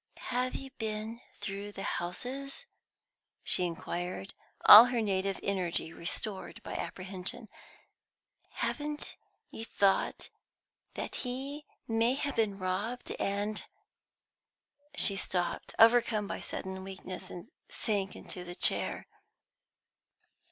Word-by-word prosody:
"Have 250 +1 0
you 270 -1 -6
been 220 +1 -3
through 200 0 -5
the 195 - -6
houses?" 260 - -4 0.8
she 180 - +4
inquired, 175 +2 -4 0.3
all 220 +3 +13
her 245 -1 0
native 195 -2 0
energy 180 -4 -1
restored 190 +4 -3
by - - -6
apprehension. 190 +4 -3 1.0
"Haven't 295 0 -3 0.4
you 225 - -6
thought 200 -3 +1 0.6
that - - -4
he 275 +4 -4 0.2
may 230 +2 +3
have 285 0 -2
been 210 -3 +2
robbed 200 +6 -2
and 205 +2 -1 0.7
" 290 0 -27
She 200 - +5
stopped, 180 -2 -1
overcome 225 -2 +6
by - - -4
sudden 190 0 -5
weakness, 190 -1 -7
and 180 - -9 0.2
sank 200 -4 -1
into 180 - -6
the 175 0 -7
chair. - - +1
205 Hz, 110 wpm, -31 LUFS, 190-245 Hz, 1.0 s, all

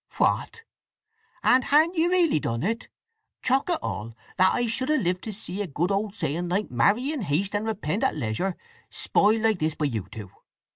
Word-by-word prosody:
"What—and 445 - -1
ha'n't 315 +5 +4
ye 330 0 +3
really 350 - +3
done 115 -3 -2
it? 225 +4 -2 0.6
Chok' 265 +5 +2
it 345 - +2
all, 110 +2 -5 0.2
that 185 0 +5
I 245 - 0
should 255 +4 -2
have 305 -4 +2
lived 180 +1 -1
to 220 - -4
see 200 -1 -5
a 205 - -3
good 170 +5 -1
old 200 +1 -1
saying 170 0 -1
like 200 +4 -1
'marry 210 - +2
in 300 -5 -3
haste 190 +3 -1
and 210 +2 -1
repent 210 -3 -2
at - - +1
leisure' 150 - -2 0.3
spoiled 215 +2 +2
like 220 -4 +2
this 155 0 0
by 150 - -1
you 115 -8 -3
two! 105 -5 -9
205 Hz, 190 wpm, -25 LUFS, 160-255 Hz, 0.6 s, that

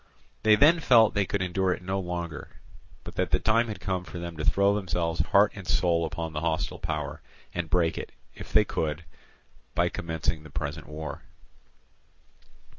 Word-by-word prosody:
They 110 -1 +6
then 155 +8 +6
felt 115 -8 +5
that 105 - 0
they 100 - +3
could 100 -2 -1
endure 95 +1 0
it 90 - -8
no 95 +1 -1
longer, 85 -4 -5 0.4
but - - -9
that - - +1
the - - +3
time 115 +2 +3
had 110 - -5
come 95 -2 -2
for 90 - -9
them 85 -1 -6
to 75 - -3
throw 100 +4 +3
themselves 85 -4 -1
heart 100 +1 +4
and 95 -3 -9
soul 85 -2 +2
upon 80 0 -4
the 75 - -3
hostile 80 -1 -1
power, 75 +1 -4 0.3
and 85 -2 -3
break 85 -1 +2
it, - - -7 0.2
if - - -10
they - - +5
could, 80 +1 -2 0.7
by - - +2
commencing 80 -1 -2
the 80 - -12
present 70 0 -5
war. 80 +1 -6
85 Hz, 185 wpm, -27 LUFS, 80-100 Hz, 0.7 s, They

